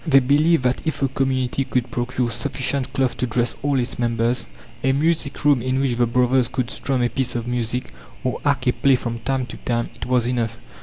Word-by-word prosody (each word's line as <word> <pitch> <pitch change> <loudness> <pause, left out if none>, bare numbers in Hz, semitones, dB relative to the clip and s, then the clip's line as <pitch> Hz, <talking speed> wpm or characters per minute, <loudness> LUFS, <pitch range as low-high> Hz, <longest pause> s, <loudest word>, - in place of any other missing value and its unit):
They 155 -5 +5
believed 145 +3 +4
that 125 0 +1
if 160 -3 -2
the 135 -2 +1
community 130 0 0
could 125 -2 -1
procure 120 0 -1
sufficient 135 +2 -2
cloth 130 -2 0
to 125 - 0
dress 120 +1 0
all 140 -1 +1
its 125 +1 -2
members, 115 0 0 0.4
a 135 - +3
music 150 -1 0
room 145 -4 +5
in 130 +2 0
which 135 -3 +1
the 120 0 +2
"brothers" 125 +1 +3
could 130 0 -2
strum 130 -3 -1
a 120 - +2
piece 130 -2 -2
of 120 -1 -2
music, 120 0 -2 0.3
or 130 - -2
act 140 -2 +1
a 125 - +3
play 135 -1 +4
from 115 -1 -3
time 130 +2 -1
to 115 - -9
time, 120 -1 -2
it - - -7
was 125 -2 +2
enough. 115 -2 -1
125 Hz, 215 wpm, -22 LUFS, 120-135 Hz, 0.4 s, They